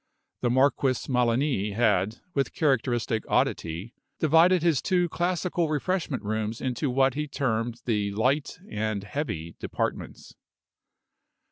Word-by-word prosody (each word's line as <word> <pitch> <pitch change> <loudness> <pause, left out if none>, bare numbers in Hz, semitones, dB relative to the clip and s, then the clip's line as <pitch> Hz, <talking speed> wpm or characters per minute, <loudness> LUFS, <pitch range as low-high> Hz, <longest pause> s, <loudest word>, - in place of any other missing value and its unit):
The 120 - +1
Marquis 130 0 +2
Melani 120 -4 +1
had, 110 -2 +1
with 135 -2 0
characteristic 120 -6 +1
oddity, 85 +9 0 0.2
divided 165 +3 +4
his 165 -7 +3
two 180 -2 +2
classical 175 -1 0
refreshment 155 -3 -1
rooms 110 +1 -2
into 130 +2 -1
what 135 +1 +3
he 150 +2 -3
termed 120 -4 -2
the 105 -4 0
Light 130 +8 0
and 105 -1 -2
Heavy 100 - -4
Departments. - - -4
125 Hz, 115 wpm, -27 LUFS, 110-150 Hz, 0.2 s, divided